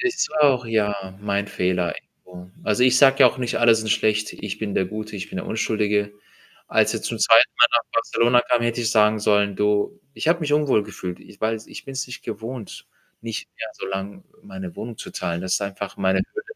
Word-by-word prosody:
Ist 370 -1 0
auch 130 -4 +4
ja, 100 -4 -1
mein 100 0 -1
Fehler 90 -2 -1 0.3
irgendwo. 90 0 -12
Also, 105 +3 +1
ich 130 0 +5
sage 135 -1 +6
ja - - +9
auch - - 0
nicht: 125 -2 -2
„Alle 120 -1 +6
sind 110 -1 -2
schlecht. 105 0 +1
Ich 105 0 -6
bin 105 -2 -4
der 95 - +2
Gute, 105 +2 -6
ich 95 - -6
bin - - -8
der - - -6
Unschuldige.“ 105 -2 0 0.6
Als - - +3
er - - -2
zum - - -3
2. - - +6
Mal 120 - +9
nach 120 - +3
Barcelona 120 +1 +3
kam, 120 -1 +1
hätte 120 +1 -1
ich 115 - 0
sagen 110 -1 +4
sollen: 105 -1 +2
„Du, 105 - 0 0.2
ich 160 - -2
habe 170 +1 +3
mich 150 -2 -2
unwohl 145 -7 +3
gefühlt, 90 -3 -7
i - - -16
weil 110 0 0
ich - - -10
bin's 135 -1 -4
nicht 125 - -9
gewohnt 110 +1 -7 0.3
nicht 115 -1 -6
mehr 115 - -5
so - - -8
lang 95 - -5 0.2
meine 190 -3 -8
Wohnung 115 0 -7
zu - - -8
teilen. 85 0 -3
Das 95 0 -1
ist - - 0
einfach 100 0 -5
meine 95 -1 +1
Höhle.“ 415 -1 -5
110 Hz, 215 wpm, -23 LUFS, 100-120 Hz, 0.6 s, ja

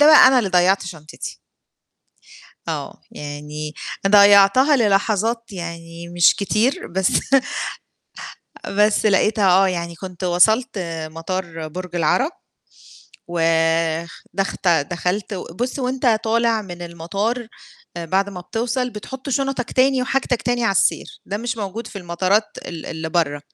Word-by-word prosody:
ده 295 - +7
بقى 310 -4 +9
أنا 260 -1 +4
اللي 210 - 0
ضيّعت 185 +2 +3
شنطتي. 155 -3 -8 1.3
آه، - - -5
يعني 150 +1 -7 0.3
ضيّعتها 205 +7 +6
للحظات 220 +1 +1
يعني 170 -1 -7
مش 175 -1 +4
كتير 225 - 0
بس 190 +2 -1 1.6
بس 210 +2 +2
لقيتها، 205 0 +3
آه، 190 +2 +5
يعني 170 -2 -3
كنت 185 +1 -8
وصلت 220 +7 +3 0.3
مطار 165 -1 -5
برج 180 +2 -7
العرب، 175 - +2 1.0
ودخت 165 +3 0
دخلت 175 +6 0
و 185 - -4
بُصّ 245 +7 -3
وأنت 255 -3 +1
طالع 230 0 +2
من 175 -3 -9
المطار 195 +8 -3 0.5
آآ 170 - -4
بعد 190 +4 +1
ما 180 -2 -7
بتوصل 245 +6 -2
بتحط 255 +5 -8
شنطك 270 -2 -1
تاني، 260 0 +3
وحاجتك 255 -2 0
تاني 245 0 0
على 225 - +2
السير. 190 - 0
ده 205 - -3
مش 230 +2 -3
موجود 215 +2 -5
في 210 - -8
المطارات 185 +4 +1 0.2
ال 165 -2 -7
اللي 160 0 -5
برّا، 155 -4 0
195 Hz, 125 wpm, -21 LUFS, 170-230 Hz, 1.6 s, بقى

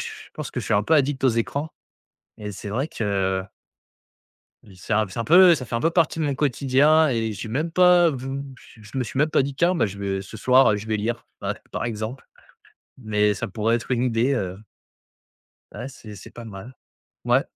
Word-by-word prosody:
je - - -8
pense - - -6
que - - -3
je - - -7
suis - - +1
un 105 0 +2
peu 160 - +3
addict 140 -2 +1
aux - - +6
écrans. 140 +7 -2 0.7
Et 105 -1 -6
c'est 100 +1 -7
vrai 130 +8 -1
que 95 -9 -1 1.2
i 95 -2 -16
c'est 95 +4 -6
un 110 0 +2
c'est 95 - -8
un 115 - -1
peu 180 +1 +7
ça 130 - -5
fait 115 - -7
un 115 - 0
peu 165 - +2
partie 165 -1 +1
de 155 - 0
mon 140 -2 0
quotidien 145 +3 +3
et 115 -3 -1
j'ai 105 +2 -7
même 155 +8 -2
pas 180 -1 +5
vou 135 +1 -5 0.3
je 110 +4 -8
me 125 - 0
suis 130 - -6
même 155 +1 +2
pas - - +3
dit: 140 0 -4
«Tiens, 175 +5 +2
bah, 165 - +2
je 100 0 -8
vais 95 -1 -2
ce 110 - -10
soir 125 -2 +4
je 105 +2 -7
vais 110 -1 0
lire», 115 +2 -3 0.2
ouais, - - -2 0.2
par - - -3
exemple. 115 +3 -5 0.7
Mais 105 -3 +1
ça - - -4
pourrait 110 +3 0
être 115 +1 -4
une 125 0 +1
idée, 125 +3 +1
heu 95 -6 -3 1.2
ouais, 130 - -6
c'est 110 -6 -11
c'est - - -12
pas 120 - -10
mal, 110 +4 -10 0.5
ouais. - - +3
120 Hz, 220 wpm, -23 LUFS, 105-140 Hz, 1.2 s, peu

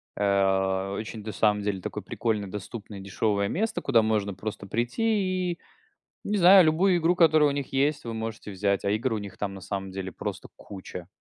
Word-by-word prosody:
Э, 95 -1 +1
очень, 110 0 -6
на 110 - -5
самом 105 0 +2
деле, 100 -2 -2
такое - - -5
прикольное, 110 -4 -2
доступное, 105 +1 -7
дешевое 100 +1 0
место, 220 - -1
куда 120 -5 +4
можно 105 -2 0
просто 100 0 -6
прийти, 185 - 0
и, 170 - -16 0.6
не 210 0 -1
знаю, 185 +1 +8
любую 175 +4 +3
игру, 170 +2 +2
которая 155 -4 +5
у - - -1
них 140 -1 -4
есть, 140 +1 +1
вы 115 - -4
можете 110 -1 -5
взять, 100 +1 0
а 100 - +2
игр 115 +3 0
у - - -1
них 100 -2 -8
там 100 -1 -3
на 95 - -9
самом 95 -1 -5
деле 95 0 -5
просто - - -5
куча. 90 -3 -9
110 Hz, 195 wpm, -26 LUFS, 100-150 Hz, 0.6 s, знаю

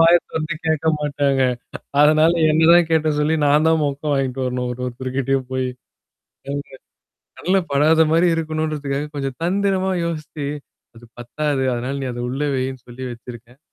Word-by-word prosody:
வாயத் 170 +1 +6
தொறந்து 155 0 -3
கேட்க 160 0 0
மாட்டாங்க. 140 -2 0 0.6
அதனால, 155 +2 +5 0.2
என்னதான் 160 +2 +5
கேட்ட 160 -1 +2
சொல்லி 150 +2 +2
நான் 150 +2 +4
தான் 160 -1 +3
மொக்க 140 0 -3
வாங்கிட்டு 135 -1 -1
வரணும். 125 0 -2
ஒரு 125 - -9
ஒரு 125 - -5
தருக்கிட்டயும் 130 0 -1
போயி. 130 -1 -1 0.8
ம். 145 - -2 0.8
கண்ல 190 +2 +2
படாத 155 +3 +4
மாரி 170 +2 +4
இருக்கணுன்றதுக்காக 155 -3 -2
கொஞ்சம் 135 -2 -4
தந்திரமா 190 +1 +1
யோசிச்சு. 155 -3 -4 0.5
அது 120 +1 -14
பத்தாது. 135 +3 -2
அதனால 125 +3 -3
நீ 135 - -3
அத 120 - -5
உள்ள 135 +3 -3
வையின்னு 130 -1 -3
சொல்லி 130 +2 -8
வச்சிருக்கேன். 120 +2 -11
145 Hz, 150 wpm, -21 LUFS, 130-160 Hz, 0.8 s, வாயத்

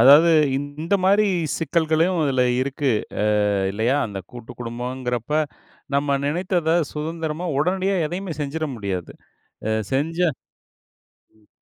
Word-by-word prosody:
அதாவது 150 +6 +8 0.3
இந்த 145 +6 -2
மாரி 205 +2 +5 0.3
சிக்கல்களும் 165 +2 +1
அதில 130 -2 +2 0.2
இருக்கு, 135 0 0 0.3
ஆ - - +2 0.5
இல்லையா? 115 +7 +1
அந்த 100 -2 -6
கூட்டுக்குடும்பம்ங்குறப்ப 125 +3 -3 0.5
நம்ம 140 0 +2
நெனைத்தத, 175 +1 0 0.2
சுதந்திரமா, 160 +2 -3
உடனடியா 190 +5 +1
எதையுமே 180 0 -4
செஞ்சிர 150 +3 -2
முடியாது. 95 -5 -4 0.6
ஆ - - +1 0.2
செஞ்சா 165 +5 +1 1.1
ம். 105 - -28
150 Hz, 105 wpm, -23 LUFS, 125-170 Hz, 1.1 s, அதாவது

